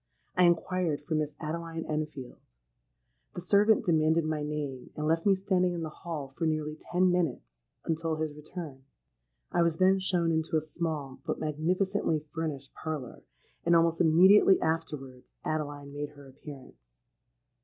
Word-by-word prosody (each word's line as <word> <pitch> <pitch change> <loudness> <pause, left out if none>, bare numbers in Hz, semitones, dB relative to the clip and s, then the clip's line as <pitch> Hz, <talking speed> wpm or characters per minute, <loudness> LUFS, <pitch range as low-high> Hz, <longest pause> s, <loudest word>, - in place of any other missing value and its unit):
I 180 -1 +5
inquired 170 -2 +1
for 165 - -3
Miss 150 -1 -1
Adeline 165 +1 -4
Enfield. 150 -4 -4 1.0
The 175 - -4
servant 205 +4 +4
demanded 160 -1 +3
my 155 -1 -1
name, 150 -3 -4
and 150 - -3
left 165 +4 +1
me 195 - +6
standing 185 -2 +1
in 170 - -3
the 160 - -3
hall 155 -4 -6
for 165 - 0
nearly 155 -1 -1
ten 180 +3 +1
minutes 155 - -2 0.2
until 165 0 -1
his 155 -1 -3
return. 150 -2 -8 0.7
I 175 - +2
was 170 -1 +2
then 190 +2 +4
shown 180 -3 +1
into 160 0 +1
a - - +1
small 155 -4 -4
but - - -2
magnificently 160 +1 0
furnished 150 -4 -4
parlour; 155 -6 -5 0.4
and 170 0 +4
almost 165 0 +3
immediately 185 +4 +6
afterwards 150 -6 -3
Adeline 145 -2 -3
made 145 0 -4
her 145 -2 -14
appearance. 135 - -12
160 Hz, 150 wpm, -29 LUFS, 150-170 Hz, 1.0 s, me